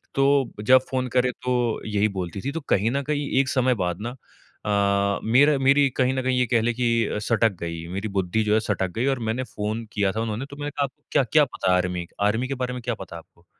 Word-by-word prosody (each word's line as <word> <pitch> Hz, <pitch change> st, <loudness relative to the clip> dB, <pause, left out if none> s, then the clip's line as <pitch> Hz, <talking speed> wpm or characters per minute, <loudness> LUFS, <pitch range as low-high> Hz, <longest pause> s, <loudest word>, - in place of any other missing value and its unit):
तो, 135 Hz, -2 st, +3 dB
जब 130 Hz, +4 st, +6 dB
फ़ोन 130 Hz, -1 st, -1 dB
करे 125 Hz, 0 st, +3 dB
तो 125 Hz, -2 st, 0 dB
यही 105 Hz, 0 st, +2 dB
बोलती 95 Hz, -1 st, -5 dB
थी। 140 Hz, -, -3 dB
तो 165 Hz, -, -3 dB
कहीं 105 Hz, +4 st, +2 dB
न 140 Hz, +2 st, 0 dB
कहीं 145 Hz, 0 st, -2 dB
एक 135 Hz, -1 st, +2 dB
समय 130 Hz, -1 st, +2 dB
बाद 90 Hz, +1 st, -3 dB
ना 120 Hz, +3 st, -5 dB, 0.5 s
अ, 100 Hz, -1 st, +1 dB
मेरा 140 Hz, +6 st, +4 dB
मेरी 140 Hz, +1 st, +4 dB
कहीं 130 Hz, 0 st, +2 dB
न 130 Hz, -, -1 dB
कहीं 130 Hz, 0 st, +1 dB
ये 125 Hz, -, +3 dB
कह 115 Hz, -2 st, +4 dB
लें 120 Hz, +1 st, +1 dB
कि 125 Hz, 0 st, -1 dB, 0.2 s
अ, -, -, -3 dB
सटक 115 Hz, +1 st, +2 dB
गई 85 Hz, -1 st, -5 dB
मेरी 100 Hz, +3 st, -3 dB
बुद्धि 95 Hz, +3 st, +1 dB
जो 105 Hz, -, +1 dB
है 110 Hz, -, +4 dB
सटक 105 Hz, -3 st, -1 dB
गई 120 Hz, +4 st, 0 dB
और 135 Hz, -2 st, +1 dB
मैंने 120 Hz, +4 st, -1 dB
फ़ोन 110 Hz, 0 st, -4 dB
किया 100 Hz, -2 st, +1 dB
था 110 Hz, -, -3 dB
उन्होंने 115 Hz, +3 st, -3 dB
तो 140 Hz, -, -8 dB
मैंने 145 Hz, 0 st, -3 dB
कहा, 145 Hz, -, -1 dB
"आपको 135 Hz, -, -6 dB
क्या-क्या 140 Hz, +4 st, +4 dB
पता 95 Hz, -7 st, -1 dB
है -, -, +5 dB
आर्मी 90 Hz, -1 st, -2 dB, 0.2 s
आर्मी 110 Hz, +5 st, 0 dB
के 135 Hz, -, -3 dB
बारे 125 Hz, 0 st, -1 dB
में 125 Hz, -, -6 dB
क्या 120 Hz, 0 st, -2 dB
पता 95 Hz, -4 st, -9 dB
है -, -, -6 dB
आपको? 85 Hz, +1 st, -23 dB
115 Hz, 250 wpm, -24 LUFS, 100-130 Hz, 0.5 s, जब